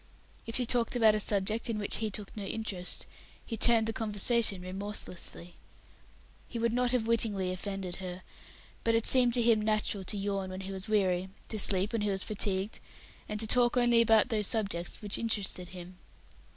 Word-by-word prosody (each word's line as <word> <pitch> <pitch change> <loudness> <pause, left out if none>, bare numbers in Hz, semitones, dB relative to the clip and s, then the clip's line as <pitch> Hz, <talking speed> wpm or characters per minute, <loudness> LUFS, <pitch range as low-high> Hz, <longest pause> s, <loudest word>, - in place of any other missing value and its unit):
If 230 - -5
she 250 - +3
talked 240 0 +1
about 225 -3 +5
a 215 - 0
subject 210 +3 -1
in 225 - -1
which 205 -1 -1
he 220 -1 -2
took 205 -1 -5
no 210 - -5
interest, 195 -3 -4 0.4
he 230 - -4
turned 225 0 +4
the 225 - -2
conversation 215 -2 +1
remorselessly. 185 -2 -6 0.9
He 235 - -6
would 230 0 0
not 250 0 +2
have 250 -3 +1
wittingly 210 -5 +1
offended 185 -1 -4
her, 185 -1 -7 0.6
but 230 0 +2
it 230 - +1
seemed 250 -2 +4
to 240 - +2
him 225 -2 +4
natural 215 -2 0
to 205 - -3
yawn 195 -1 -2
when 185 +1 -6
he 190 0 -6
was 190 +2 -4
weary, 190 -3 +1 0.2
to 215 - -2
sleep 195 +2 +5
when 230 - 0
he 205 - 0
was 195 -1 0
fatigued, 200 0 -2 0.5
and 210 - -3
to - - +4
talk 240 +2 +4
only 240 -1 +4
about 225 0 +4
those 210 -4 0
subjects 200 -5 -3
which 205 - -2
interested 205 -5 -2
him. 180 0 -10
210 Hz, 190 wpm, -30 LUFS, 190-230 Hz, 0.9 s, about